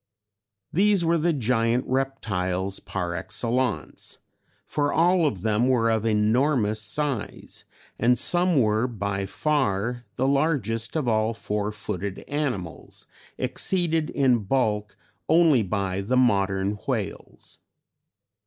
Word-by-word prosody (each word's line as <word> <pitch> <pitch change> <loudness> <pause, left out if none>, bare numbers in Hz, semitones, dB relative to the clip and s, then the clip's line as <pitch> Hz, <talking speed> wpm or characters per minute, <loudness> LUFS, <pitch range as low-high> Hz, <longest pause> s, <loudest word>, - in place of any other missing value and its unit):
These 195 0 +3
were 165 0 +2
the 170 +2 +2
Giant 120 -3 +1
Reptiles 100 -8 -1
par 90 -3 -4
excellence, 115 +6 -2 0.5
for 145 -1 0
all 170 0 +3
of 100 -11 -3
them 110 +2 +2
were 115 -3 +3
of 110 0 0
enormous 110 +1 +2
size, 135 0 -3 0.3
and 125 +2 +3
some 175 +4 +2
were 110 +1 +2
by 100 -4 -3
far 120 -3 -1
the 130 - 0
largest 135 -6 0
of 150 -5 -1
all 110 0 +1
four 105 -1 -2
footed 100 -2 -5
animals, 125 - -4 0.3
exceeded 165 -4 0
in 130 -4 +2
bulk 105 -2 -1 0.3
only 160 -6 +5
by 95 -1 -2
the 125 +6 0
modern 100 -4 +1
whales. - - -5
115 Hz, 115 wpm, -25 LUFS, 105-140 Hz, 0.5 s, only